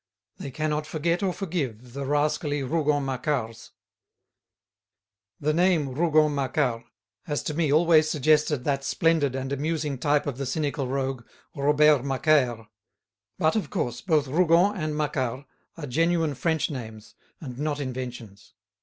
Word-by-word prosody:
They - - -6
cannot 150 +2 -2
forget 170 +3 -1
or 195 -2 +1
forgive 135 - -4
the 140 0 -4
rascally 145 0 0
Rougon 145 0 0
Macquarts. 130 -4 -3 1.7
The 155 +1 0
name 170 -4 +2
Rougon 155 0 +3
Macquart 130 -4 -1 0.4
has 145 -1 -2
to 155 - -3
me 155 -2 0
always 155 0 +4
suggested 150 -2 +2
that 140 -1 -1
splendid 150 -3 +1
and 135 +1 -3
amusing 150 -1 -2
type 145 +1 +1
of 140 -2 -4
the 135 - -3
cynical 140 -1 -2
rogue, 135 -2 -2 0.3
Robert 150 0 +4
Macaire. 135 -4 +1 0.7
But, 155 +4 +2
of 215 - -1
course, 120 - -3
both 155 -6 +1
Rougon 175 +6 +3
and 155 -5 -3
Macquart 140 -3 -2 0.3
are 160 - -5
genuine 165 +3 +1
French 160 +3 -1
names 110 -5 -8 0.3
and 130 -4 -8
not 150 -1 -2
inventions. 125 -6 -7
145 Hz, 135 wpm, -26 LUFS, 130-155 Hz, 1.7 s, always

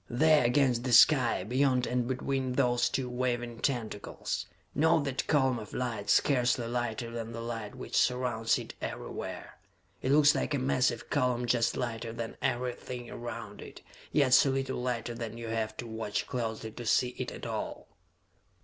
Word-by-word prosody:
"There 155 +3 +4
against 125 -1 +2
the 125 -1 -1
sky, 120 -5 +6
beyond 125 +3 +2
and 125 -1 -1
between 130 0 -1
those 120 -2 +2
two 130 +1 -2
waving 120 -1 -2
tentacles! 115 -7 -3 0.3
Note 160 0 +3
that 135 -2 -2
column 130 -5 +2
of 105 - -9
light, 115 -5 -3
scarcely 125 -3 +3
lighter 120 -1 -2
than 115 -1 -5
the 115 - -5
light 115 -1 -5
which 125 - -6
surrounds 125 -3 +2
it - - -7
everywhere? - - -6 0.4
It 130 - 0
looks 145 0 +6
like 150 - -1
a - - +1
massive 130 -2 0
column 125 -1 +1
just 120 -1 +1
lighter 115 -2 -3
than 115 0 -5
everything 125 -1 -3
around 120 0 -7
it, - - -11 0.3
yet 140 -4 +3
so 135 +1 +7
little 135 -1 -1
lighter 120 -2 -2
that 115 -1 -6
you 115 -1 -6
have 110 -1 -2
to 120 - -5
watch 110 -2 -3
closely 110 -2 -4
to 120 +2 -8
see 125 +2 +3
it - - -3
at - - -8
all?" - - -4
120 Hz, 165 wpm, -30 LUFS, 115-130 Hz, 0.4 s, so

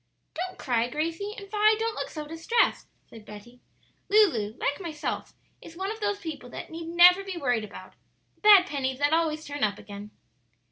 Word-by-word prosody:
"Don't 365 +2 -5
cry, 240 -3 0
Gracie; 330 +8 -3
and, 400 -1 -9
Vi, 425 +1 +3
don't 450 0 -1
look - - -5
so 305 -2 -7
distressed," 330 +10 0 0.2
said 225 -2 -13
Betty. 210 +4 -13 0.5
"Lulu, 275 - +3
like 285 +6 -2
myself, 315 -4 -5 0.3
is 330 - -12
one 385 +2 -3
of 445 - -7
those 410 -1 -1
people 300 -7 -7
that - - -8
need 325 0 -7
never 355 +3 +6
be 385 -2 -6
worried 245 -8 0
about 210 - -11 0.4
the - - -36
bad 410 -3 +8
pennies 265 -6 -3
that 290 +2 +1
always 315 -1 0
turn 290 0 -5
up 205 -1 +1
again." 205 0 -10
320 Hz, 185 wpm, -27 LUFS, 255-390 Hz, 0.5 s, bad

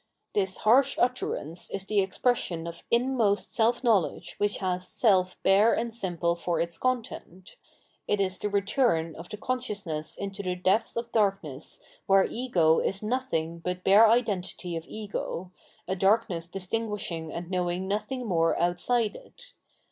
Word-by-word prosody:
This 190 -2 0
harsh 260 +5 +4
utterance 240 -9 -1
is 195 -1 -4
the 210 0 +1
expression 190 -3 0
of 170 0 -7
inmost 235 -4 +1
self 235 +2 +2
knowledge 215 -8 +1
which 205 0 +1
has 185 -1 -1
self 185 -5 +2
bare 200 +4 +5
and 230 0 -2
simple 175 -6 0
for 170 -1 -2
its 170 0 -2
content; 225 -7 -3 0.5
it 205 - +1
is 190 -1 -1
the 210 - -2
return 200 - +1
of 165 +2 -10
con 255 +3 -1
sciousness 175 -10 -3
into 200 0 -5
the 180 -2 -2
depth 190 +6 +1
of 235 0 -3
darkness 195 - -1 0.3
where 195 0 +5
Ego 180 -10 +2
is 195 +2 -2
no 245 +5 +1
thing 165 -10 -3
but 180 +1 -4
bare 210 +3 +7
identity 195 -6 0
of 165 0 -6
Ego, 200 -4 -5 0.4
a 190 - -1
darkness 190 -3 +1
distinguishing 190 -4 -3
and 175 +1 -6
knowing 180 0 -1
nothing 245 +6 -2
more 165 -5 +1
outside 205 +7 +1
it. - - -14
195 Hz, 150 wpm, -27 LUFS, 175-225 Hz, 0.5 s, bare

